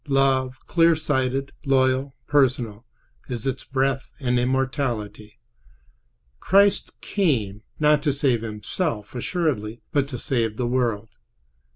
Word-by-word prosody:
Love, 135 -2 +2
clear 165 -1 +4
sighted, 135 -3 -1
loyal, 130 0 +2
personal, 125 -6 +1 0.4
is 120 -3 -4
its 135 -1 -2
breath 135 0 -1
and 125 -3 +1
immortality. 125 -5 -2 1.0
Christ 200 - +3
came, 115 - 0 0.2
not 150 -1 +4
to 145 -1 +1
save 135 -4 +1
Himself, 110 - -3
assuredly, 120 - -2
but 145 -3 +1
to 135 -3 -5
save 115 -5 -1
the 125 - -1
world. 120 -3 0
130 Hz, 110 wpm, -24 LUFS, 120-140 Hz, 1.0 s, clear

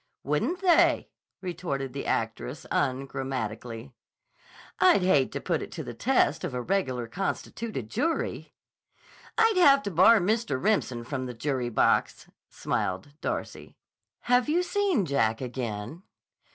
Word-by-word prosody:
"Wouldn't 150 - -1
they!" 350 -3 +4 0.3
retorted 160 -8 -4
the 140 - -5
actress 115 +5 -2
ungrammatically. 130 -3 -3 0.9
"I'd 355 - +5
hate 145 -8 +3
to - - -2
put - - -1
it - - -7
to - - -5
the - - -7
test - - +1
of - - -3
a 125 - -2
regular 130 -10 -1
constituted 195 - -4
jury." 325 - -2 0.8
"I'd 450 -3 +4
have 280 -6 +6
to 200 - -3
bar 190 +7 +6
Mr. 200 - 0
Remsen 130 - 0
from 130 +1 -4
the 125 - -7
jury 130 -1 -2
box," 115 - +1 0.2
smiled 95 +10 -2
Darcy. - - -5 0.4
"Have 245 +2 +2
you 345 +4 +2
seen 380 - +1
Jack 115 -7 +1
again?" 120 - -5
140 Hz, 130 wpm, -27 LUFS, -, 0.9 s, have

